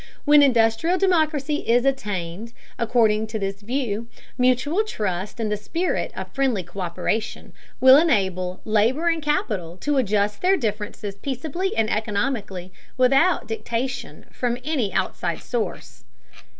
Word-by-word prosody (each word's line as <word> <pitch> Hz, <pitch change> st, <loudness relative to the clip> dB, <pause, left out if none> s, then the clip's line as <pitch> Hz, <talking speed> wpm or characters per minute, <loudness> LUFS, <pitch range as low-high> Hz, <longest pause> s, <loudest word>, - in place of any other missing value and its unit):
When 295 Hz, 0 st, +7 dB
industrial 245 Hz, +6 st, +3 dB
democracy 310 Hz, -6 st, +1 dB
is 240 Hz, 0 st, +2 dB
attained, 210 Hz, -5 st, -2 dB, 0.3 s
according 220 Hz, -2 st, +2 dB
to 220 Hz, +1 st, -4 dB
this 195 Hz, -1 st, -4 dB
view, 230 Hz, -1 st, -2 dB, 0.3 s
mutual 255 Hz, -, +2 dB
trust 205 Hz, -, -4 dB
and 220 Hz, -2 st, -1 dB
the -, -, +2 dB
spirit 330 Hz, -, -2 dB
of -, -, -7 dB
friendly 260 Hz, -8 st, 0 dB
co÷peration 180 Hz, +4 st, -3 dB, 0.3 s
will 260 Hz, +1 st, +8 dB
enable 190 Hz, -, +1 dB
labor 230 Hz, +10 st, +2 dB
and 330 Hz, -1 st, 0 dB
capital 205 Hz, -, -1 dB
to 290 Hz, +7 st, -1 dB
adjust 210 Hz, -3 st, +1 dB
their 380 Hz, +2 st, +4 dB
differences 210 Hz, -, -4 dB
peaceably 305 Hz, -, -3 dB
and 225 Hz, -1 st, +2 dB
economically, 205 Hz, -4 st, -2 dB, 0.2 s
without 270 Hz, +8 st, +3 dB
dictation 235 Hz, +3 st, -4 dB
from 240 Hz, -1 st, -1 dB
any 270 Hz, -10 st, -1 dB
outside 180 Hz, -2 st, -2 dB
source. 240 Hz, -3 st, -4 dB
230 Hz, 125 wpm, -23 LUFS, 205-275 Hz, 0.3 s, will